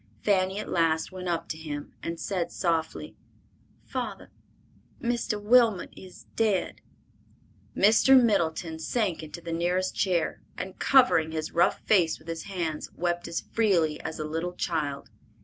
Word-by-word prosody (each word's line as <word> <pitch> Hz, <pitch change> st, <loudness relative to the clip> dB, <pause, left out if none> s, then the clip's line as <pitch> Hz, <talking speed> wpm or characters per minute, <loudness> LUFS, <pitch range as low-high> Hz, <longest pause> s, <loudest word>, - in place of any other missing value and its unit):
Fanny 190 Hz, -1 st, +2 dB
at 210 Hz, -, -4 dB
last 165 Hz, -1 st, +1 dB
went 185 Hz, -1 st, -6 dB
up 170 Hz, -1 st, -1 dB
to 155 Hz, -, -4 dB
him 145 Hz, -2 st, -6 dB
and 165 Hz, 0 st, -5 dB
said 180 Hz, -4 st, -2 dB
softly, 165 Hz, -3 st, -2 dB, 0.7 s
"Father, -, -, -5 dB, 0.7 s
Mr. 235 Hz, -4 st, -1 dB
Wilmot 225 Hz, -2 st, +3 dB
is 185 Hz, -1 st, -13 dB
dead!" 215 Hz, -5 st, 0 dB, 1.0 s
Mr. 225 Hz, +6 st, +6 dB
Middleton 170 Hz, -8 st, +1 dB
sank 185 Hz, +2 st, -1 dB
into 160 Hz, +2 st, -9 dB
the 170 Hz, 0 st, -5 dB
nearest 180 Hz, +2 st, 0 dB
chair, 175 Hz, -4 st, 0 dB, 0.2 s
and 185 Hz, -, -6 dB
covering 245 Hz, -, +4 dB
his 155 Hz, -1 st, -3 dB
rough 170 Hz, +1 st, +2 dB
face 180 Hz, -6 st, +3 dB
with 155 Hz, -, -21 dB
his 165 Hz, 0 st, -5 dB
hands, 170 Hz, -6 st, -3 dB
wept 175 Hz, 0 st, -1 dB
as 170 Hz, -, -3 dB
freely 175 Hz, -9 st, +2 dB
as 160 Hz, -, -5 dB
a 155 Hz, -, -3 dB
little 165 Hz, +3 st, -3 dB
child. 145 Hz, -10 st, -3 dB
175 Hz, 145 wpm, -27 LUFS, 160-200 Hz, 1.0 s, Mr